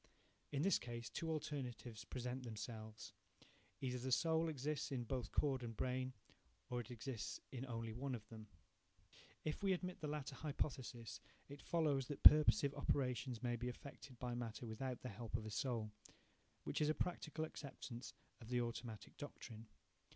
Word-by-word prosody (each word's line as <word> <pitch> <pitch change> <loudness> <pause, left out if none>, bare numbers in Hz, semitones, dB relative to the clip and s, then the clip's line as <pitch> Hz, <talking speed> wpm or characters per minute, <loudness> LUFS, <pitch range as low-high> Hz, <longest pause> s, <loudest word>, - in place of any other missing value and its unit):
In 145 +1 +1
this 195 - +5
case, 120 -1 -5
two 165 - -2
alternatives 130 -7 -3
present 125 +1 -2
themselves,–either 115 +2 -6
the 130 +2 -2
soul 160 +4 +4
exists 150 0 -1
in 125 -3 0
both 120 -1 -2
cord 135 -3 +3
and 115 -3 -4
brain, 130 0 0 0.6
or 125 - +1
it 120 - -10
exists 120 -1 -3
in 130 0 -4
only 115 -2 -2
one 130 +2 -1
of 110 -2 -8
them. 110 -1 -8 1.0
If 155 - -1
we 195 -1 +4
admit 180 0 -2
the 155 - -1
latter 150 -2 -2
hypothesis, 135 -5 -2 0.3
it 140 0 -8
follows 145 -6 +2
that 145 - -5
purposive 150 -1 +10
operations 125 -3 +1
may 120 -1 +2
be 120 +1 -1
effected 130 0 -8
by 125 0 -2
matter 120 0 -3
without 125 +3 -3
the 125 - -2
help 110 +1 -4
of 110 - -5
a 110 - -4
soul, 110 -1 0 0.7
–which - - -1
is 150 - +5
a 155 - +3
practical 160 -1 -1
acceptance 130 -5 -6 0.3
of 115 - -10
the 125 -1 +3
automatic 115 -2 -3
doctrine. 115 -6 -7
125 Hz, 160 wpm, -42 LUFS, 115-145 Hz, 1.0 s, purposive